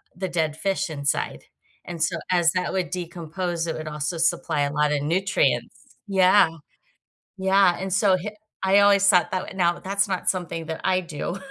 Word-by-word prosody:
the 190 0 -4
dead 160 -3 -1
fish 195 0 -1
inside 140 -2 -2 0.4
and 170 -2 -7
so 170 +1 0 0.2
as 170 -2 +3
that 185 - -1
would 185 -2 -1
decompose 170 0 -4
it 160 - -2
would 155 0 -6
also 150 +2 -3
supply 170 -2 0
a 140 0 0
lotta 150 -1 +1
nutrients. 185 +7 0 0.3
Yeah. 190 -1 +5 0.9
Yeah, 190 -1 +3
and 190 0 -4
so 195 -2 +3
h 205 +4 -5 0.3
I 195 +1 +5
always 200 -1 +5
thought 180 -4 +3
that 185 - 0
w - - -9
now, 175 -2 +1
that's 200 +1 0
not 185 -3 -1
something 165 -3 -3
that 160 - -5
I 185 0 +2
do 175 +2 -5
180 Hz, 175 wpm, -24 LUFS, 165-190 Hz, 0.9 s, Yeah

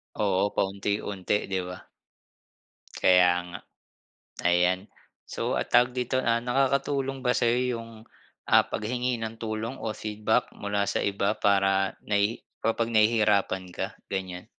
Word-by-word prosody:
Oo, 100 -1 +1
paunti-unti, 100 0 -1 0.2
di 95 - +1
ba? 90 0 -9 1.1
Kaya 90 -1 +5 0.2
nga, 90 - -7 0.9
ayan. 90 +1 +3 0.5
So, - - -4 0.2
ah, - - -1
tawag 120 +1 +4
dito? 125 +1 0
Ah, 115 -2 +1
nakakatulong 135 +1 0
ba 125 - +3
sayo 120 0 +2 0.2
yung, 115 0 -9 0.6
ah, - - +7
paghingi 125 +3 -1
ng 110 0 -4
tulong 110 +2 -3
o 110 - -2
feedback 110 +1 -1
mula 100 -1 -1
sa 100 - -1
iba 100 +1 0
para 95 -2 +2
nahi 105 +2 0 0.2
kapag 115 +1 0
nahihirapan 105 -3 +3
ka, - - -2 0.2
ganyan? 95 0 -4
105 Hz, 130 wpm, -27 LUFS, 95-115 Hz, 1.1 s, ah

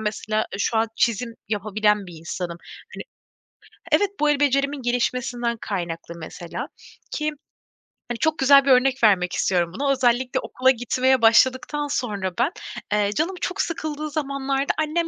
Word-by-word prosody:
mesela, 215 0 -3 0.2
ııı, - - -5
şu 225 - 0
an 225 +1 +2
çizim 230 +1 0
yapabilen 210 -1 0
bir 175 - -10
insanım. 170 +1 -5 0.4
Hani - - -6 0.9
evet, 410 - +4
bu, 300 - +3
el 290 -1 +2
becerimin 280 0 +1
gelişmesinden 245 -1 -1
kaynaklı 170 -3 -4
mesela, 170 +1 -7 0.4
ki, 305 0 -1 0.8
hani, 240 - -3
çok 315 0 +1
güzel 275 +1 +6
bir - - +1
örnek 260 0 +3
vermek 180 -4 +4
istiyorum 175 -2 0
buna. 275 +6 0
Özellikle 255 -1 +1
okula 260 +1 +2
gitmeye 255 +1 +1
başladıktan 260 +6 +3
sonra 205 -9 -2
ben, 255 +7 +2 0.4
eee, 205 -1 +2
canım 345 - 0
çok 365 - -1
sıkıldığı 310 -2 -4
zamanlarda, 275 -2 -1
annem 315 +2 0
250 Hz, 145 wpm, -23 LUFS, 210-280 Hz, 0.9 s, güzel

